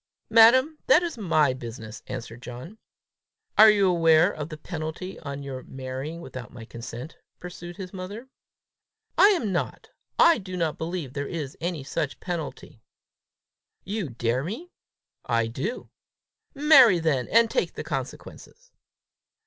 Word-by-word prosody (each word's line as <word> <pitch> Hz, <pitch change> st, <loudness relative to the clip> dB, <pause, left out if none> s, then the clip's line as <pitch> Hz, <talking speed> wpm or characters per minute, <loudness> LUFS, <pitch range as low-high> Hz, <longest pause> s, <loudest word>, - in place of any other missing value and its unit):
"Madam, 260 Hz, +7 st, +6 dB
that 305 Hz, +7 st, +6 dB
is 340 Hz, -, -3 dB
my 155 Hz, -, +2 dB
business," 115 Hz, -3 st, -8 dB
answered 120 Hz, -2 st, -7 dB
John. 130 Hz, -, -9 dB, 0.8 s
"Are 220 Hz, +1 st, +9 dB
you 200 Hz, -2 st, +4 dB
aware 165 Hz, -3 st, +4 dB
of 150 Hz, 0 st, -6 dB
the 155 Hz, -, -7 dB
penalty 160 Hz, +3 st, -6 dB
on 140 Hz, -2 st, -6 dB
your 135 Hz, -2 st, -6 dB
marrying 135 Hz, +6 st, -6 dB
without 130 Hz, -6 st, -9 dB
my 120 Hz, -2 st, -10 dB
consent?" 120 Hz, +5 st, -8 dB, 0.2 s
pursued 175 Hz, -1 st, -9 dB
his 185 Hz, -1 st, -8 dB
mother. 200 Hz, +7 st, -7 dB, 0.9 s
"I 395 Hz, -, +7 dB
am 340 Hz, -, +1 dB
not. 175 Hz, -, -3 dB, 0.3 s
I 335 Hz, -4 st, +6 dB
do 185 Hz, -2 st, -7 dB
not 165 Hz, -3 st, -1 dB
believe 160 Hz, -5 st, -4 dB
there 140 Hz, 0 st, -3 dB
is 150 Hz, -5 st, -5 dB
any 170 Hz, -4 st, -3 dB
such 140 Hz, +1 st, -3 dB
penalty." 160 Hz, -9 st, -6 dB, 1.0 s
"You 200 Hz, -5 st, -3 dB
dare 120 Hz, +2 st, -1 dB
me?" 240 Hz, -, -6 dB, 0.5 s
"I 115 Hz, -1 st, +1 dB
do." 130 Hz, -, -5 dB, 0.6 s
"Marry, 275 Hz, -, +7 dB
then, 155 Hz, -7 st, 0 dB
and 230 Hz, 0 st, +5 dB
take -, -, -1 dB
the -, -, -6 dB
consequences." -, -, -7 dB
165 Hz, 140 wpm, -26 LUFS, 130-210 Hz, 1.0 s, Are